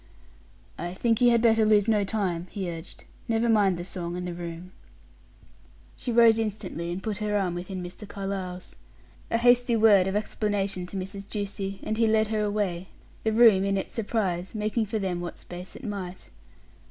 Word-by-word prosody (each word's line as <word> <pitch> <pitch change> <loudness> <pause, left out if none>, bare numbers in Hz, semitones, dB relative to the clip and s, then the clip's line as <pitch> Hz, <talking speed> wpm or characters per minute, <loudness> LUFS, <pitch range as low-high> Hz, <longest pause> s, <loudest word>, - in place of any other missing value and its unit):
"I 175 +1 -4
think 230 +2 +1
you 245 - +7
had 235 -1 +3
better 225 -1 +5
lose 210 -1 +4
no 215 -2 +3
time," 190 -4 -2
he 190 -4 -4
urged. 165 +1 -9 0.2
"Never 230 0 +1
mind 205 -5 +3
the 175 - -5
song 175 -2 -5
and 180 0 -4
the 175 - -4
room." 170 +1 -7 1.2
She 245 - -4
rose 230 -1 +6
instantly, 200 -6 -3
and 185 +2 -5
put 215 -1 -3
her 210 -1 0
arm 185 -3 0
within 180 +1 -5
Mr. 180 +4 -9
Carlyle's. 195 -2 -5 0.5
A 230 - +2
hasty 245 0 +4
word 210 -4 +5
of 190 - -1
explanation 200 -3 -1
to 195 - -6
Mrs. 195 +1 -6
Ducie, 195 -2 -4
and 215 - -2
he 225 - +4
led 220 0 +3
her 215 -1 0
away, 205 -4 -1 0.4
the 220 - +1
room, 220 -4 +6
in 195 0 +1
its 190 - -4
surprise, 200 -5 -2
making 215 +1 0
for 220 +2 -2
them 185 -4 -2
what 175 - -6
space 180 +1 -9
it - - -11
might. 195 -5 -6
200 Hz, 185 wpm, -27 LUFS, 180-220 Hz, 1.2 s, you